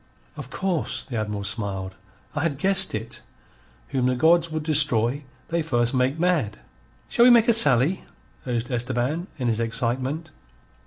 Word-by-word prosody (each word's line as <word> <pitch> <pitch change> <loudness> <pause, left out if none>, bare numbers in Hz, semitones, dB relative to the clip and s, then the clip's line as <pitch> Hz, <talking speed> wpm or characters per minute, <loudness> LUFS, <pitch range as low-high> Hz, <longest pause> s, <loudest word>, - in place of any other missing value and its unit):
"Of - - -8
course." 185 -4 -2
The 125 -5 -6
Admiral 105 -1 -3
smiled. 100 -3 -3 0.4
"I 145 - -2
had 155 -3 -1
guessed 190 - +2
it. 110 +2 -6 0.7
Whom 125 -2 0
the 130 - +1
gods 165 +5 +3
would 155 -1 -4
destroy 145 -3 +2 0.2
they 170 0 0
first 120 -6 0
make 130 +3 0
mad." 160 - 0 0.5
"Shall 235 - +2
we - - +8
make 235 -1 +5
a 235 - +5
sally?" 145 - +4 0.4
urged 120 0 -3
Esteban, 125 +7 -2
in 125 -3 -2
his 115 -1 0
excitement. 130 +7 -3
130 Hz, 155 wpm, -23 LUFS, 115-165 Hz, 0.7 s, we